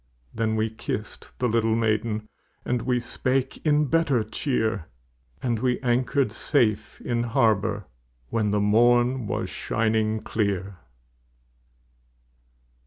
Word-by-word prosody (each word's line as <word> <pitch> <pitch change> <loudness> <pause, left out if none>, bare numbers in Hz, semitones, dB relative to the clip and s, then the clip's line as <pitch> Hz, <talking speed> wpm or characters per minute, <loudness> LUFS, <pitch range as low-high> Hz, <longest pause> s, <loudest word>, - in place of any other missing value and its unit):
Then 110 -1 0
we 110 0 0
kissed 110 - -6
the 125 - +1
little 115 -1 +2
maiden, 110 -1 0 0.4
And 125 -1 0
we 125 0 +1
spake 130 +2 -2
in 150 -1 +3
better 145 -6 +2
cheer, 110 - -1 0.6
And 120 -3 0
we 125 +1 +1
anchored 125 0 +1
safe 110 -4 0
in 120 -1 -1
harbor 110 -4 +1 0.4
When 110 -2 0
the 105 0 +1
morn 120 +3 +3
was - - -2
shining 110 -1 0
clear. 100 -3 -2
115 Hz, 110 wpm, -25 LUFS, 110-125 Hz, 0.6 s, in